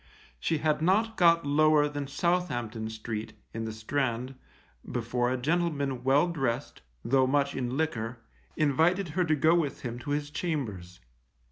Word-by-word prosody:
She 165 - 0
had 155 0 0
not 215 +7 +2
got 170 -4 +4
lower 150 +1 +4
than 145 -1 -4
Southampton 125 -9 -1
Street, 110 0 -5 0.2
in 115 0 -3
the 110 - -3
Strand, 120 +2 -2 0.6
before 120 +1 0
a 130 - 0
gentleman 140 -3 -1
well 140 +6 +4
dressed, 135 -6 -2 0.2
though 130 +1 +3
much 140 +1 +1
in 125 0 -2
liquor, 125 -7 -2 0.4
invited 165 +5 +2
her 180 +4 +1
to 155 -2 +2
go 160 +3 +4
with 160 -6 0
him 120 0 -4
to 120 - -8
his 145 0 -1
chambers. 110 - -4
140 Hz, 150 wpm, -29 LUFS, 120-160 Hz, 0.6 s, got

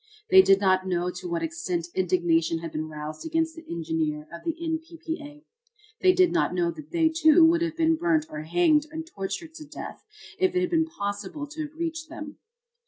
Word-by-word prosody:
They 190 - +10
did 195 +1 +5
not 190 -1 +2
know 180 0 0
to 180 0 -7
what 170 -1 -2
extent 165 +1 -3
indignation 170 -3 +2
had 165 -1 -6
been 155 +1 -4
roused 155 0 -7
against 325 0 -1
the 330 - -10
engineer 160 -2 -2
of 170 - -9
the 330 -2 -2
N. 325 -1 -1
P. 330 +1 -14
P. 325 0 -5
A. 295 +1 -12 0.6
They 370 - +6
did 365 -1 +4
not 345 - +1
know 170 -1 +1
that 305 - -11
they, 330 -2 +3
too, 320 +1 +6
would 335 +1 +4
have 330 -1 -2
been 325 -1 +3
burnt 320 -2 +2
or 150 - -6
hanged 305 - +3
and 320 +1 -6
tortured 200 - -5
to 315 - -9
death 295 - -9 0.4
if 375 0 +2
it 365 - +3
had 360 -1 -1
been 325 -1 +2
possible 205 +2 -4
to 305 +1 -5
have 300 - -22
reached 325 -1 -3
them. 305 -2 -8
300 Hz, 215 wpm, -26 LUFS, -, 0.6 s, They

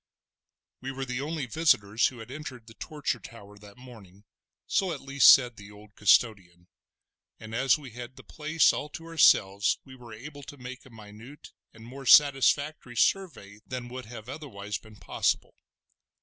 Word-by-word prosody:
We 135 +1 -5
were 135 0 -5
the 125 0 -4
only 155 -1 -3
visitors 115 -6 +2
who 130 - -8
had 115 +2 -10
entered 135 -5 -8
the 115 - -14
Torture 150 +7 -4
Tower 105 -3 -13
that 105 +1 -15
morning—so 115 - -6
at 150 - -5
least 140 +1 +6
said 125 -3 +4
the 100 0 -12
old 105 0 -16
custodian—and 95 +1 -2
as 130 +4 +3
we 140 -4 -11
had 120 +2 -9
the - - -14
place 155 +1 +2
all 150 - -5
to 165 - -10
ourselves 105 -11 +3
were 125 -3 -13
able 145 +6 -10
to 145 +1 -11
make 130 +1 -10
a - - -16
minute 110 +5 -13 0.2
and 110 0 -15
more 135 +2 -10
satisfactory 145 -2 +4
survey 110 - 0
than 125 -1 -6
would 130 -1 -8
have 115 0 -11
otherwise 115 -8 -6
been 110 -1 -17
possible. - - -1
125 Hz, 160 wpm, -27 LUFS, 105-140 Hz, 0.2 s, least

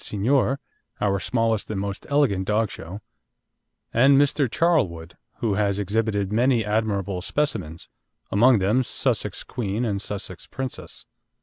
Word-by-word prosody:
Signor, 130 +6 +1 0.4
our 100 -1 +1
smallest 115 +2 0
and 105 -3 -2
most 100 0 -5
elegant 115 -10 +2 0.2
show - - -8
dog; 95 +6 -8 0.9
and 135 +4 +5
Mr. 140 -1 +2
Charlwood, 95 - 0 0.3
who 110 -4 +1
has 100 -1 +1
exhibited 105 0 -1
many 120 -1 +3
admirable 100 -3 -1
specimens, 95 - -3 0.4
among 120 +4 +5
them 105 +6 +2
Sussex 120 -5 -1
Queen 115 -1 -3
and 100 -3 -1
Sussex 100 -4 -6
Princess. 130 -1 -7
105 Hz, 125 wpm, -24 LUFS, 100-125 Hz, 0.9 s, and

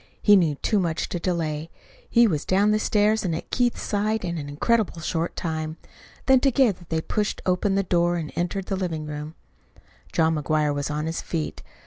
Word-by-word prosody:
He 205 - +7
knew 165 -6 +3
too 210 +8 0
much 170 -3 -1
to 175 - -3
delay. 165 -3 -2 0.4
He 235 0 +5
was 160 -9 0
down 200 +3 +3
the 215 - +2
stairs 215 +1 +2
and 170 -4 -1
at 165 - -7
Keith's 245 -1 +1
side 210 0 0
in 170 -2 -3
an 145 -1 -6
incredibly 180 +2 0
short 165 +1 -2
time. 155 -2 -3 0.5
Then 265 -1 +6
together 245 -9 +2
they 160 -1 0
pushed 210 +5 -2
open 190 +2 +1
the 195 - +2
door 175 -1 +2
and 160 -3 -4
entered 175 +3 -2
the 195 - -2
living 170 -5 -3
room. 150 +1 -6 0.8
John 160 0 +2
McGuire 150 -1 +1
was 145 0 -2
on 150 +1 -2
his 165 +1 -3
feet. 160 -3 -4
175 Hz, 190 wpm, -24 LUFS, 155-205 Hz, 0.8 s, He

